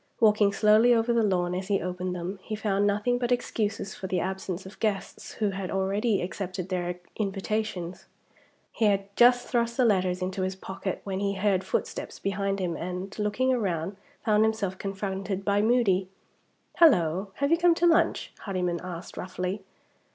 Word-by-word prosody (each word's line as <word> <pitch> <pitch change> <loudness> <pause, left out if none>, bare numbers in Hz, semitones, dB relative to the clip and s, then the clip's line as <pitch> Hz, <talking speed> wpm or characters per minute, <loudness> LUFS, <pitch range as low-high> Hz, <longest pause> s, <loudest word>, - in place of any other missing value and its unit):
Walking 210 -2 +5
slowly 215 +4 +5
over 230 +1 +2
the 235 - +3
lawn 180 -4 +1
as 185 +1 -3
he 200 -1 +2
opened 180 +1 -3
them, 180 +3 -5
he 215 - -4
found 205 -1 +1
nothing 210 +5 +1
but 245 0 -1
excuses 210 -5 -1
for 190 - -6
the 185 -1 0
absence 190 0 -3
of 190 - -12
guests 210 -3 -3
who 210 -2 0
had 190 -1 -4
already 200 +2 0
accepted 185 0 -4
their 180 -1 -2 0.2
invitations. 195 -3 -3 0.6
He 225 - 0
had 200 -1 +1
just 245 0 +5
thrust 235 0 0
the 255 - +4
letters 185 -4 +2
into 185 +1 -3
his 185 0 -1
pocket, 190 0 -5
when 190 -1 -3
he 200 0 0
heard 190 -1 +1
footsteps - - -3
behind 195 0 -1
him, 175 -3 -1
and, 180 +3 -5
looking 210 +5 +1
round, 190 -4 -2 0.3
found 215 -1 +4
himself 220 -4 0
confronted 195 0 -3
by 200 0 +3
Moody. 210 -5 +2 0.7
"Hullo! 190 - +4
have 280 +2 0
you 335 - +5
come 345 -1 +5
to 345 - +1
lunch?" 330 -2 +3
Hardyman 180 -4 -2
asked, 180 -1 -7
roughly. 185 +2 -3
195 Hz, 170 wpm, -27 LUFS, 185-215 Hz, 0.7 s, Walking